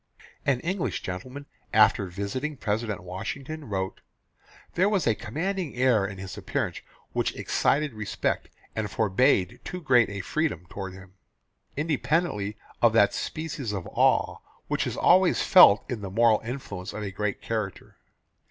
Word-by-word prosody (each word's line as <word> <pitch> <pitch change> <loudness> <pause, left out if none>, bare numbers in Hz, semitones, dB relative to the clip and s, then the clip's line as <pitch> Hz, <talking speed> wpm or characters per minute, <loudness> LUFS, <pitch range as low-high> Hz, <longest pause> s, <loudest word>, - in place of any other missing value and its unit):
An 130 -3 +2
English 185 +1 -2
gentleman 125 +10 -6 0.3
after 110 -2 +4
visiting 100 - -4
President 105 -3 -2
Washington 135 - -6
wrote, 95 -3 -3 0.7
"There 190 +4 +3
was 200 -5 +1
a 115 - +4
commanding 165 - -3
air 120 -6 +3
in 95 -1 -8
his 95 0 -7
appearance - - -2 0.3
which - - 0
excited 150 -2 +1
respect 110 -2 -2 0.3
and 110 -1 -2
forbade 95 -2 +2
too 180 - -5
great 125 - +4
a 100 -1 -4
freedom 90 - -2
toward 95 -2 -6
him, 95 0 -13 0.6
independently 150 - 0 0.2
of 115 -2 +5
that 105 -3 +5
species 145 -8 -4
of 95 -4 -4
awe - - +2 0.3
which - - 0
is - - -4
always 185 0 +4
felt 180 - +7
in 120 -4 -4
the 100 - -5
moral 110 +2 +4
influence 110 -6 -6
of 105 - -5
a 100 - -4
great 105 +1 -2
character. 110 -4 -4
110 Hz, 145 wpm, -27 LUFS, 100-145 Hz, 0.7 s, felt